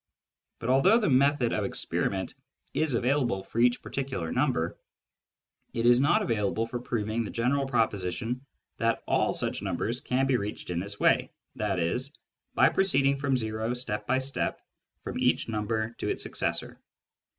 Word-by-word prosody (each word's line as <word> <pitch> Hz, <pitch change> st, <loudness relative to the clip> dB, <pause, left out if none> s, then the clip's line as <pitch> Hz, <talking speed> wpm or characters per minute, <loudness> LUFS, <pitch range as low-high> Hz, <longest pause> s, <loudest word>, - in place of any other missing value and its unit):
But 115 Hz, -, -1 dB
although 160 Hz, -, +5 dB
the 210 Hz, -10 st, +1 dB
method 135 Hz, -2 st, +3 dB
of -, -, 0 dB
experiment 95 Hz, -1 st, -2 dB, 0.4 s
is 155 Hz, -5 st, +1 dB
available 120 Hz, -5 st, +1 dB
for 110 Hz, -, -5 dB
each 120 Hz, +1 st, +3 dB
particular 130 Hz, -12 st, -3 dB
natural 125 Hz, -, +2 dB
number, 85 Hz, -, -1 dB, 1.0 s
it 115 Hz, 0 st, 0 dB
is 120 Hz, +1 st, +6 dB
not 140 Hz, -, +3 dB
available 110 Hz, -1 st, 0 dB
for 120 Hz, +1 st, -4 dB
proving 115 Hz, -2 st, -2 dB
the 105 Hz, -, -5 dB
general 135 Hz, +4 st, 0 dB
proposition 115 Hz, +1 st, -1 dB, 0.3 s
that 115 Hz, 0 st, 0 dB
all -, -, +2 dB
such -, -, -2 dB
numbers 120 Hz, +4 st, -2 dB
can 130 Hz, +2 st, +1 dB
be 135 Hz, -2 st, +2 dB
reached 100 Hz, -3 st, -5 dB
in 85 Hz, -, -1 dB
this 100 Hz, +2 st, -6 dB
way, -, -, +3 dB, 0.3 s
i.e. 95 Hz, -1 st, 0 dB, 0.6 s
by -, -, +6 dB
proceeding 140 Hz, -8 st, +3 dB
from 135 Hz, -2 st, +1 dB
o 110 Hz, +2 st, -2 dB
step 105 Hz, -4 st, -3 dB
by 130 Hz, -, +3 dB
step 130 Hz, +1 st, -1 dB, 0.4 s
from -, -, -4 dB
each -, -, +2 dB
number 110 Hz, 0 st, -1 dB
to -, -, -2 dB
its -, -, -2 dB
successor. -, -, -2 dB
120 Hz, 160 wpm, -28 LUFS, 105-135 Hz, 1.0 s, is